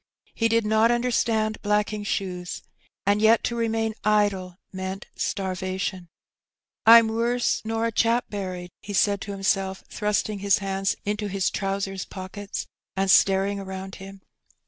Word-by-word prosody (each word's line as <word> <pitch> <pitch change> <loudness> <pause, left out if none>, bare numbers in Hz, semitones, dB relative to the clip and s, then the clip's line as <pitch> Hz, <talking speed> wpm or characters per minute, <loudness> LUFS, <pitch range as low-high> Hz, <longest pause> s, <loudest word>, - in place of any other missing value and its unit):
He 230 - +1
did 230 -1 +2
not 220 +2 +4
understand 230 -2 +1
blacking 210 0 0
shoes^ 180 -3 -3 0.4
and 205 +1 +3
yet 220 +1 +5
to 235 - -1
remain 225 -1 0
idle 200 -4 +1 0.2
meant 190 +1 -5
starvation. 185 -1 -3 0.8
'^ - - +10
Pm 230 -1 +9
wuss 235 +2 0
nor 225 +1 -1
a 230 - 0
chap 230 +2 +2
buried/' 185 -3 -5
he 205 - -7
said 200 0 +2
to 200 - -5
himself, 195 -1 -1
thrust 210 -1 0
ing 210 -2 -5
his 200 -1 +3
hands 195 -1 -1
into 210 0 -1
his 195 -1 0
trousers 195 -1 -2
pockets 200 +1 -6 0.3
and 195 0 +2
staring 195 +1 +4
around 190 0 -7
him. 195 0 -11
200 Hz, 145 wpm, -25 LUFS, 190-220 Hz, 0.8 s, ^